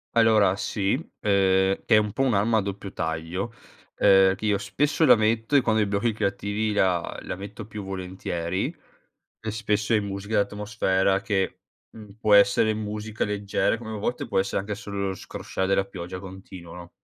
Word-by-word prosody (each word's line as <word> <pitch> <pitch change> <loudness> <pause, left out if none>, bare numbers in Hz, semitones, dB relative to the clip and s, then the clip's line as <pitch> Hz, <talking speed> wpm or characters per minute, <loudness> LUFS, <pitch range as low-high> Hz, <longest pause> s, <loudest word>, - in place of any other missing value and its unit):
Allora, 110 -4 +4
sì, 100 -1 -1
uhm, - - -6 0.8
è 115 - +5
un 105 -1 +3
po' 135 +6 0
un'arma 115 -2 +2
a - - +3
doppio 100 0 -6
taglio, 85 +8 -3 0.5
uhm, 95 0 +6
che 110 - -6
io 105 -1 +2
spesso 145 +10 +1
la - - +8
metto 110 +4 +1
e 140 - +7
quando 110 -2 +1
ho - - +4
i - - -4
blocchi 100 +4 0
creativi 105 +1 -1
la 90 -4 +1
la 90 - -5
metto 100 +1 -8
più 105 -1 -7
volentieri; 95 -2 -3 0.7
spesso 105 0 -1
è 105 - +3
musica 100 +2 -4
d'atmosfera 100 -2 +1
che, 100 -3 -1 0.3
mhmm, 105 -2 -13
può 110 -2 +3
essere 110 +1 +5
musica 105 0 -4
leggera, 100 +1 0
come 110 -1 -8
a - - -4
volte 120 +4 -2
può - - -2
essere 95 - 0
anche 105 +1 -5
solo 100 -2 -3
scrosciare 95 +1 -4
della 95 0 +2
pioggia 90 -1 -7
continuo, 95 -2 -10
no? 85 0 -10
100 Hz, 175 wpm, -25 LUFS, 95-110 Hz, 0.8 s, la